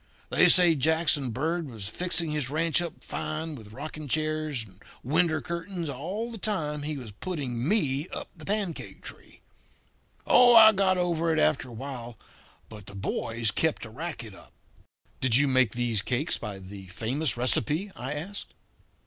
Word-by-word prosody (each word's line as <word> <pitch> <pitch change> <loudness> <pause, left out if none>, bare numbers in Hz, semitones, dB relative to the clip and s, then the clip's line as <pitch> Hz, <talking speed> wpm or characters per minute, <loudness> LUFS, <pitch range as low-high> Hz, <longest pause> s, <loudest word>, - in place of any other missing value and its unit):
They - - +6
say 175 -3 +7
Jackson 155 -2 +1
Bird 160 +6 -2
was 110 -5 -6
fixing 170 +4 0
his 150 -4 -2
ranch 165 +3 +1
up 170 -3 -7
fine 155 +1 -4
with 110 -7 -11
rocking 150 +4 -7
chairs 155 -3 -1
and 95 0 -20 0.2
window 155 +4 +2
curtains 170 0 -4
all 190 - -4
the 225 - -8
time 150 -8 -2
he 150 0 -3
was 120 -5 -8
putting 130 - -4
me 150 -7 +1
up - - -6
the 160 - -13
pancake 200 -2 -3
tree. - - -12 0.8
Oh, 245 -1 +7
I 220 -1 +10
got 190 -2 +2
over 170 -2 +1
it 160 - +1
after 135 -3 +2
a - - -10
while. 120 -2 -7 0.5
But 105 -3 -12
the 100 - -9
boys 115 +3 -1
kept 160 -1 0
the 110 - -8
racket 130 - -6
up." - - -16 0.7
"Did 130 -4 +3
you 145 +2 +6
make 130 -5 +3
these 120 -4 0
cakes 130 - 0
by 105 -4 -6
the 95 0 -10
famous 120 - -1
recipe?" 150 +9 +1
I 130 +4 -4
asked. 180 +7 -6
150 Hz, 165 wpm, -27 LUFS, 120-170 Hz, 0.8 s, I